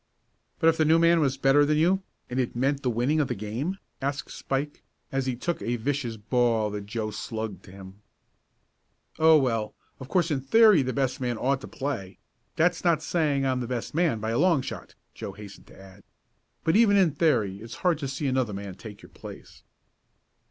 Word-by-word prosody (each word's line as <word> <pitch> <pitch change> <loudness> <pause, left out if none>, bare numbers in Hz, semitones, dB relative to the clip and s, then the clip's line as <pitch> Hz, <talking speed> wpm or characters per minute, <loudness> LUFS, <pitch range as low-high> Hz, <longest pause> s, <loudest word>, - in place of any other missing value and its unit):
"But 160 - +2
if 165 0 +4
the 155 - +3
new 160 +2 +4
man 170 0 +4
was 135 -3 +1
better 135 +2 +4
than 150 +1 +2
you, 180 +5 +3 0.3
and 125 +1 -3
it 125 -2 -1
meant 135 +3 0
the 130 - 0
winning 125 +7 +1
of 145 - +1
the - - -3
game?" 115 - -4 0.2
asked 140 +1 -3
Spike, 140 +2 -3 0.3
as 135 -1 -1
he 130 - -1
took 170 +8 -3
a 120 - -1
vicious 120 -1 -2
ball 110 0 +1
that 100 -1 -6
Joe 110 -1 -3
slugged 110 +1 -5
to 95 - -13
him. 95 +1 -12 1.2
"Oh, 160 0 +7
well, 115 -6 -1 0.2
of 130 - -8
course 175 -3 +1
in 140 -3 0
theory 210 - +6
the 130 -1 -1
best 130 +1 -1
man 120 -2 -1
ought 135 +3 0
to - - -8
play 120 -9 -5 0.4
that's 175 +3 +1
not 165 -3 +2
saying 150 -6 0
I'm 130 -1 0
the 120 - -4
best 125 -2 -4
man 160 -8 +1
by 110 +1 -3
a 115 - 0
long 165 -5 +3
shot!" - - -8 0.2
Joe 100 - -7
hastened 100 0 -12
to - - -16
add; 95 +1 -15 0.6
"but 160 - +2
even 210 -2 +5
in 185 -5 +4
theory 125 - +1
it's 115 +1 -9
hard 170 -4 +3
to 140 - -3
see 135 +2 -4
another 130 -5 0
man 100 -1 -6
take 105 +2 -11
your - - -13
place." - - -12
130 Hz, 205 wpm, -26 LUFS, 110-155 Hz, 1.2 s, Oh